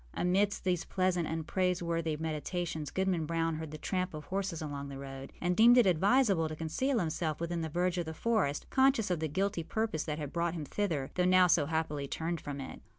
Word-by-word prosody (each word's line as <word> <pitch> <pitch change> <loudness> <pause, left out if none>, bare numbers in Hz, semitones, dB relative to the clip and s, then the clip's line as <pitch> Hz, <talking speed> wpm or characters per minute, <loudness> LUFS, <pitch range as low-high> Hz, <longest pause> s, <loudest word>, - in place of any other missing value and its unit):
Amidst 195 +3 +1
these 180 -3 +1
pleasant 185 -3 0
and 160 0 -3
praiseworthy 170 -3 0
meditations, 160 0 -3
Goodman 185 -4 0
Brown 165 -1 0
heard 160 -1 -5
the 155 - -7
tramp 185 +1 -2
of 150 -1 -7
horses 190 -3 -2
along 145 -2 -5
the 135 - -7
road, 135 0 -8
and 180 0 0
deemed 235 +5 +7
it 245 - +6
advisable 195 0 +3
to 155 - -5
conceal 165 - -1
himself 160 -4 -1
within 170 0 -2
the 160 - -3
verge 180 +2 0
of 170 - -3
the 160 - -4
forest, 205 -11 0
conscious 265 -7 +3
of 175 - 0
the 160 - -1
guilty 190 +3 -1
purpose 170 -1 -2
that 150 -2 -3
had 145 -3 -5
brought 170 0 0
him 155 -3 -4
thither, 160 -8 -2
though 180 - +1
now 185 0 +6
so 165 -4 +3
happily 150 -3 -2
turned 165 +2 -3
from 145 -1 -5
it. 135 - -7
170 Hz, 215 wpm, -32 LUFS, 155-185 Hz, -, deemed